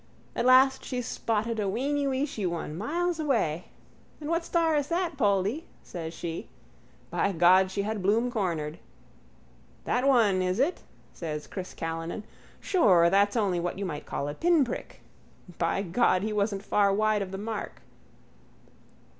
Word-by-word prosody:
At 245 - +1
last 265 +1 +5
she 250 - -3
spotted 225 0 -2
a 200 -2 0
weeny 280 +6 0
weeshy 265 -7 -1
one 165 -3 -4
miles 335 - -1
away. 220 - 0 0.5
And 305 +1 -4
what 335 0 +1
star 330 -2 +1
is 290 -1 0
that, 340 0 -1
Poldy? 205 - +1 0.2
says 165 -3 -6
she. 165 0 -6 0.6
By 200 - +1
God, 185 +2 +5
she 200 +1 -2
had 215 0 -3
Bloom 225 +6 +2
cornered. 170 - -2 1.1
That 250 +2 +1
one, 220 -8 +4
is 185 +1 0
it? 300 +8 +1 0.3
says 150 -3 -5
Chris 185 -2 -7
Callinan, 165 +5 -4 0.4
sure 180 - +4
that's 200 +2 +3
only 195 -5 +1
what 175 +1 -3
you 200 - -3
might 150 -5 -5
call 140 - -3
a 145 - -3
pinprick. 330 - 0 0.6
By 170 +3 0
God, 185 0 +2
he 215 0 -2
wasn't 200 -1 -1
far 200 -1 +3
wide 215 +1 +2
of 195 - -3
the 195 - -4
mark. 215 +2 -5
205 Hz, 155 wpm, -28 LUFS, 180-265 Hz, 1.1 s, last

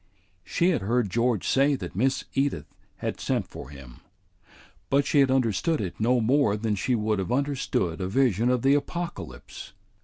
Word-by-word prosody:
She 175 +2 +1
had 155 - 0
heard 115 0 0
George 115 -1 0
say 140 +1 +3
that 90 -9 -7
Miss 135 +6 0
Edith 135 - 0 0.3
had - - -4
sent - - -1
for 65 - -10
him; 70 -4 -12 0.9
but 140 0 +3
she 145 - +2
had 135 -1 +5
understood 130 - +1
it 95 -4 -5
no 120 +3 +3
more 120 -2 +2
than 110 0 -1
she 120 +5 0
would 105 -2 0
have 95 - -3
understood 125 - -1
a 90 - -1
vision 120 0 +2
of 125 -2 +1
the 135 +1 +5
Apocalypse. 145 - -5
120 Hz, 175 wpm, -26 LUFS, 100-140 Hz, 0.9 s, had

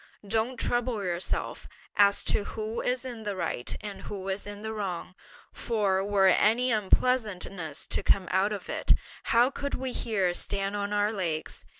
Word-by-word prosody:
Don't 225 +4 0
trouble 240 -3 0
yourself 175 -1 -2 0.3
as 200 0 +5
to - - +1
who 220 +2 -3
is 250 +1 -1
in 240 -3 -6
the 205 -2 -3
right, 170 -8 -2
and 205 -2 -7
who 195 -2 -5
is 195 +2 -3
in 205 0 -8
the 220 0 -3
wrong; 185 -4 -4 0.4
for 200 -5 +1
were 200 -1 +3
any 225 +6 +4
unpleasantness 200 - 0
to - - 0
come 190 -3 +2
out 190 +3 +3
of 200 -3 -4
it, - - +3 0.3
how 240 +3 +4
could 280 0 -3
we 260 0 -3
here 195 -8 0
stand 195 +2 -1
on 205 0 -2
our 205 0 +2
legs? 170 -7 -3
205 Hz, 170 wpm, -28 LUFS, 190-225 Hz, 0.4 s, as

